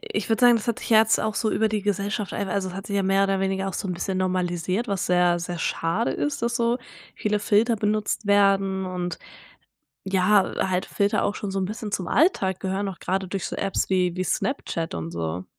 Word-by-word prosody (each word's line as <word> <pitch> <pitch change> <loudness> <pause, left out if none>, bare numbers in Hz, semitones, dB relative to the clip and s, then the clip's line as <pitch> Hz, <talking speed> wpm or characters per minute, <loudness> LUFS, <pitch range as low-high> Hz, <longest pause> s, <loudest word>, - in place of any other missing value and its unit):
ich 205 - -4
würde 225 +2 +1
sagen, 240 -1 +7
das 225 +2 -4
hat 235 - 0
sich - - -7
ja 220 - +7
jetzt 220 0 +4
auch 215 -1 -1
so 220 - 0
über 220 +1 +2
die 210 -1 -1
Gesellschaft 205 0 -2
einfach 195 -2 -2
also, 195 -2 -1
es 180 - -8
hat 195 +1 -7
sich 200 - -2
ja 195 - +2
mehr 195 +1 +3
oder 195 -1 0
weniger 195 0 -1
auch 195 - -5
so 190 - -4
'n - - -1
bisschen 185 +2 -2
normalisiert, 185 +3 -1
was 195 -2 -1
sehr, 180 -1 +3
sehr 175 0 -5
schade 165 +7 0
ist, 290 -5 -2
dass 235 0 0
so 235 0 +1 0.4
viele 210 0 0
Filter 220 +3 +2
benutzt 210 0 -1
werden. 195 -1 +3
Und, 180 -2 -4 0.9
ja, 190 +1 +3 0.2
halt 185 0 0
Filter 200 0 +1
auch 205 - -1
schon 205 - -4
so 195 - -1
'n - - 0
bisschen 215 0 -6
zum 185 - -2
Alltag 195 - +2
gehören, 195 +1 -2
auch 190 - -7
grade 190 0 -2
durch 195 0 -3
so - - -5
Apps 195 -1 -1
wie 180 -2 +1
wie 185 - -1
Snapchat 170 - -2
und 85 0 -5
so. 85 +2 -3
195 Hz, 230 wpm, -24 LUFS, 185-210 Hz, 0.9 s, sagen